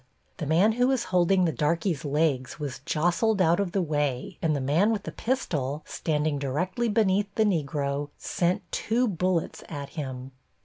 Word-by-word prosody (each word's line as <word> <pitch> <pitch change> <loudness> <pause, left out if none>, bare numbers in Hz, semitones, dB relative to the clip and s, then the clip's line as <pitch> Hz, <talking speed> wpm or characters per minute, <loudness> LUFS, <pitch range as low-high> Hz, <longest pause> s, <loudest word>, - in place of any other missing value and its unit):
The 155 - -4
man 175 +8 +4
who 245 +3 +2
was 260 -3 +1
holding 180 +1 +4
the 160 - 0
darkey's 165 - 0
legs 145 -2 0
was 145 -3 -4
jostled 175 +7 +1
out 170 0 +4
of 200 -3 0
the 190 0 +1
way 145 -5 -2
and 155 -2 +1
the - - -1
man 155 +11 +2
with 210 -3 -1
the - - -5
pistol, 150 - -2
standing 150 -2 -1
directly 180 - -1
beneath 205 -2 +2
the 220 - +3
Negro, 145 -5 -1
sent 175 +1 0
two 245 +3 +1
bullets 180 -3 -1
at 145 -3 -6
him. 130 -4 -6
165 Hz, 170 wpm, -27 LUFS, 145-195 Hz, -, man